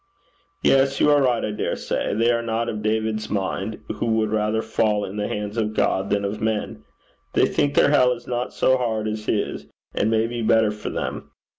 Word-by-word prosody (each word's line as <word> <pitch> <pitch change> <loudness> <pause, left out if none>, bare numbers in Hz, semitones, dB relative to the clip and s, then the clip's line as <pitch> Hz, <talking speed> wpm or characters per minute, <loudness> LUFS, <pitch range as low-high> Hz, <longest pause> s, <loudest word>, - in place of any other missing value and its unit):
'Yes. 135 0 +3
You 150 - +5
are 145 -1 +5
right, 125 -3 +2
I 105 - -2
dare 105 - -2
say. - - -2
They 115 +2 +3
are 115 -1 +1
not 115 0 -2
of 105 - -4
David's 110 0 -1
mind, 100 +1 -3
who 115 - -1
would 110 -1 +1
rather 110 +1 0
fall 110 -2 0
into 105 +2 -5
the 105 - -1
hands 105 +1 -4
of 110 -1 -1
God 95 +1 +1
than 100 0 0
of 105 +2 -4
men. 110 -1 -2 0.5
They - - +4
think 145 - 0
their - - +5
hell 125 -4 +5
is 120 - -11
not 125 +1 -3
so 130 - +2
hard 110 -3 -1
as 110 0 -4
his, 105 - -2 0.3
and 105 - +1
may 110 0 +2
be 120 0 -4
better 110 -1 +3
for 105 0 -6
them. - - -4
110 Hz, 210 wpm, -23 LUFS, 105-115 Hz, 0.5 s, You